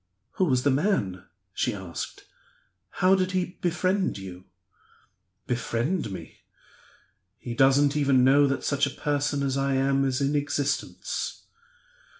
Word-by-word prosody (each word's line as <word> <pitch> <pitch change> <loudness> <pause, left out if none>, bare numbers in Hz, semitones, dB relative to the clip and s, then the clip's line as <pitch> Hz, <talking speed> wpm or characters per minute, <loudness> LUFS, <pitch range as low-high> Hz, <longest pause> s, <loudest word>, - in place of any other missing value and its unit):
"Who 190 - +3
was 130 -6 +1
the 145 - +3
man?" 105 - 0 0.3
she 120 +2 -1
asked. 95 -4 -7 0.8
"How 185 - +7
did 185 -1 +1
he 180 -1 -2
befriend 185 - 0
you?" 95 -2 -9 1.0
"Befriend 125 - -1
me? 95 - -9 1.0
He 120 +2 -6
doesn't 135 +3 +4
even 135 -3 +3
know 140 +2 +5
that 135 0 -2
such 140 0 +1
a 140 - -8
person 145 -1 0
as 135 -1 0
I 135 0 +1
am 135 +1 +2
is 130 -1 0
in 140 +1 0
existence." 145 -1 -2
140 Hz, 135 wpm, -26 LUFS, 130-145 Hz, 1.0 s, How